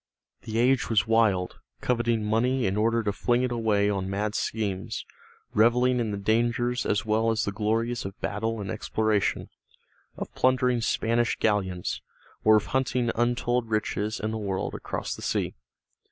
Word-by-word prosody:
The 110 Hz, 0 st, -4 dB
age 130 Hz, +3 st, +3 dB
was 110 Hz, -2 st, +3 dB
wild, 110 Hz, -5 st, +2 dB, 0.2 s
coveting 120 Hz, -3 st, 0 dB
money 125 Hz, +4 st, +1 dB
in 95 Hz, 0 st, 0 dB
order 115 Hz, +2 st, +2 dB
to 105 Hz, -, 0 dB
fling 120 Hz, +3 st, +1 dB
it 125 Hz, -, 0 dB
away 110 Hz, -4 st, +2 dB
on 95 Hz, -2 st, -1 dB
mad 105 Hz, +2 st, -1 dB
schemes, 100 Hz, -5 st, -2 dB, 0.5 s
reveling 125 Hz, +3 st, +4 dB
in 115 Hz, -2 st, -1 dB
the 100 Hz, -, -3 dB
dangers 120 Hz, +4 st, +1 dB
as 100 Hz, -1 st, 0 dB
well 110 Hz, +1 st, +2 dB
as 115 Hz, -1 st, +1 dB
the 100 Hz, -, -1 dB
glories 115 Hz, +3 st, -1 dB
of 95 Hz, +1 st, -7 dB
battle 110 Hz, +2 st, -2 dB
and 100 Hz, -, -4 dB
exploration, 110 Hz, -1 st, 0 dB, 0.7 s
of -, -, -6 dB
plundering 125 Hz, -1 st, +2 dB
Spanish 115 Hz, +1 st, +1 dB
galleons, 95 Hz, -4 st, -1 dB, 0.4 s
or 110 Hz, 0 st, +6 dB
of 105 Hz, -, +2 dB
hunting 125 Hz, -2 st, +1 dB
untold 120 Hz, 0 st, 0 dB
riches 110 Hz, 0 st, -1 dB
in 110 Hz, +2 st, -2 dB
the 110 Hz, -, -3 dB
world 100 Hz, -3 st, -2 dB
across -, -, -4 dB
the -, -, -9 dB
sea. -, -, -1 dB
110 Hz, 160 wpm, -27 LUFS, 105-120 Hz, 0.7 s, or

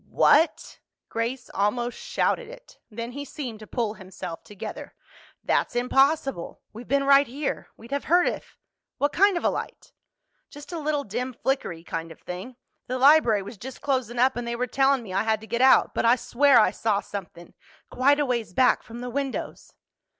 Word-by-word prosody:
"What?" 315 Hz, +2 st, +3 dB, 0.3 s
Grace 240 Hz, +3 st, -3 dB
almost 240 Hz, +4 st, 0 dB
shouted -, -, -1 dB
it. -, -, -14 dB
Then 230 Hz, +2 st, -6 dB
he 285 Hz, +3 st, -6 dB
seemed 255 Hz, -7 st, -7 dB
to 215 Hz, -, -11 dB
pull 230 Hz, -4 st, -2 dB
himself 190 Hz, -4 st, -8 dB
together. 205 Hz, -2 st, -8 dB, 0.5 s
"That's -, -, 0 dB
impossible. 270 Hz, -, +1 dB
We've 230 Hz, +2 st, -10 dB
been 275 Hz, +2 st, +2 dB
right 280 Hz, 0 st, +5 dB
here. 275 Hz, +4 st, -4 dB
We'd 230 Hz, +3 st, -14 dB
have 280 Hz, 0 st, -2 dB
heard 350 Hz, +1 st, +4 dB
if—What 285 Hz, +1 st, -5 dB
kind 395 Hz, 0 st, +4 dB
of -, -, -4 dB
a -, -, +3 dB
light?" -, -, -7 dB, 0.6 s
"Just 290 Hz, +3 st, -11 dB
a 340 Hz, -, -4 dB
little 295 Hz, -1 st, -1 dB
dim 250 Hz, +4 st, -4 dB
flickery 220 Hz, -11 st, -1 dB
kind 165 Hz, -1 st, -5 dB
of 165 Hz, -, -13 dB
thing. 185 Hz, +8 st, -8 dB, 0.3 s
The 255 Hz, -, -2 dB
library 255 Hz, -7 st, +5 dB
was 200 Hz, +1 st, -10 dB
just 260 Hz, +1 st, -9 dB
closin' 260 Hz, -4 st, -1 dB
up 260 Hz, +2 st, +3 dB
and 240 Hz, 0 st, -4 dB
they 235 Hz, -, -2 dB
were 250 Hz, +1 st, -1 dB
tellin' 270 Hz, +1 st, +2 dB
me 190 Hz, -4 st, -8 dB
I 195 Hz, -, +2 dB
had 220 Hz, 0 st, +1 dB
to -, -, -10 dB
get 235 Hz, +2 st, -2 dB
out. 265 Hz, 0 st, +5 dB
But -, -, 0 dB
I 235 Hz, +2 st, +6 dB
swear 270 Hz, +2 st, +4 dB
I 215 Hz, -, +4 dB
saw 210 Hz, 0 st, 0 dB
somethin'—quite 205 Hz, -, -3 dB
a 290 Hz, -, +2 dB
ways 235 Hz, -7 st, -2 dB
back 255 Hz, +6 st, +3 dB
from 235 Hz, +1 st, -10 dB
the 250 Hz, -, -5 dB
windows." 275 Hz, 0 st, -4 dB
250 Hz, 185 wpm, -25 LUFS, 220-280 Hz, 0.6 s, I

